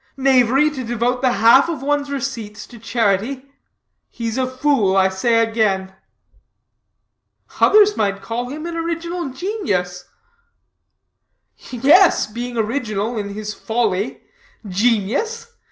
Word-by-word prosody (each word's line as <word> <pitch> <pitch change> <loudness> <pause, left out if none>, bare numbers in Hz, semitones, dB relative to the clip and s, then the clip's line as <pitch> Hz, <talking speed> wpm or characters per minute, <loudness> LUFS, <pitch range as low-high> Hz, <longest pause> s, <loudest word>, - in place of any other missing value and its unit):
Knavery 270 +2 +3
to 265 -3 -6
devote 240 +2 -1
the 255 -2 +2
half 240 +7 +5
of 305 -6 -4
one's 290 0 -1
receipts 240 -7 -5
to 235 - -14
charity? 225 +3 -1 0.6
He's 230 -1 -5
a 260 -1 0
fool 255 -8 +1
I 190 0 +4
say 230 +4 +1
again." 195 -4 -1 1.7
"Others 420 0 +5
might 200 -2 -1
call 235 +4 -4
him 305 +4 -7
an 340 0 -5
original 335 -1 -3
genius." 200 - -3 1.6
"Yes, 290 +10 +4
being 240 +3 -6
original 225 -1 -2
in 205 -2 -4
his 215 0 -5
folly. 220 -2 -2 0.5
Genius? 245 - -1
240 Hz, 115 wpm, -19 LUFS, 215-280 Hz, 1.7 s, half